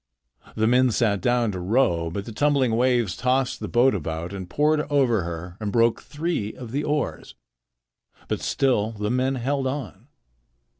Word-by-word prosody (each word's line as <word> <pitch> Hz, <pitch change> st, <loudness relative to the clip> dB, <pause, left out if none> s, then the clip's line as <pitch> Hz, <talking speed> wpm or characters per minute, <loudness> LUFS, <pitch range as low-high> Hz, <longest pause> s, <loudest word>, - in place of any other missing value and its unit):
The 110 Hz, -, +1 dB
men 125 Hz, +2 st, +4 dB
sat 105 Hz, -3 st, +1 dB
down 120 Hz, -2 st, +1 dB
to 95 Hz, -, -5 dB
row, 90 Hz, -4 st, +1 dB
but 100 Hz, +4 st, -5 dB
the 115 Hz, -, -7 dB
tumbling 135 Hz, -1 st, +2 dB
waves 120 Hz, -5 st, +2 dB
tossed 130 Hz, +1 st, 0 dB
the -, -, -4 dB
boat 130 Hz, +2 st, +3 dB
about 85 Hz, 0 st, -4 dB
and 95 Hz, -2 st, -7 dB
poured 150 Hz, +4 st, +2 dB
over 130 Hz, -7 st, +3 dB
her 85 Hz, +1 st, -6 dB
and 105 Hz, -2 st, -3 dB
broke 115 Hz, 0 st, +2 dB
three 150 Hz, -9 st, -3 dB
of 120 Hz, -3 st, -9 dB
the 145 Hz, +3 st, -1 dB
oars. 150 Hz, 0 st, -2 dB, 0.9 s
But -, -, -2 dB
still 115 Hz, -5 st, +1 dB
the 105 Hz, 0 st, -3 dB
men 130 Hz, +2 st, +1 dB
held 135 Hz, +2 st, -1 dB
on. 130 Hz, -5 st, -5 dB
120 Hz, 165 wpm, -24 LUFS, 100-135 Hz, 0.9 s, men